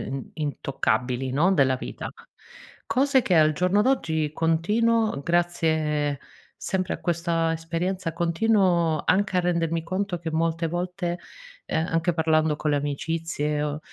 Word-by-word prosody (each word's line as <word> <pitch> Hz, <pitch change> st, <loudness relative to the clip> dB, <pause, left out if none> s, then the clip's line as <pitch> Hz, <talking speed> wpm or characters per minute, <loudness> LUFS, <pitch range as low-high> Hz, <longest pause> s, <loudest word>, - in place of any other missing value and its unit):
int 135 Hz, -, -7 dB
intoccabili 135 Hz, -3 st, -1 dB
no, 160 Hz, +8 st, +3 dB
della 135 Hz, -6 st, +3 dB
vita. 130 Hz, -, -6 dB, 0.8 s
Cose 270 Hz, 0 st, +3 dB
che 185 Hz, -, +1 dB
al 155 Hz, -1 st, +5 dB
giorno 180 Hz, +6 st, +2 dB
d'oggi 160 Hz, -, 0 dB
continuo 210 Hz, +6 st, +1 dB
grazie, 160 Hz, -4 st, 0 dB, 0.4 s
sempre 185 Hz, -1 st, -2 dB
a -, -, -14 dB
questa 165 Hz, -1 st, 0 dB
esperienza, 165 Hz, +2 st, -3 dB
continuo 170 Hz, -2 st, +2 dB
anche 195 Hz, 0 st, +2 dB
a -, -, +5 dB
rendermi 165 Hz, -2 st, 0 dB
conto 185 Hz, +1 st, -2 dB
che 165 Hz, -1 st, -4 dB
molte 165 Hz, +1 st, 0 dB
volte, 175 Hz, +1 st, -3 dB, 0.5 s
ehm, 160 Hz, -, -1 dB
anche 165 Hz, +1 st, +1 dB
parlando 160 Hz, -1 st, +2 dB
con 150 Hz, -, -1 dB
le 145 Hz, -, +2 dB
amicizie 150 Hz, +1 st, -2 dB
o 150 Hz, 0 st, -2 dB
165 Hz, 135 wpm, -25 LUFS, 155-180 Hz, 0.8 s, al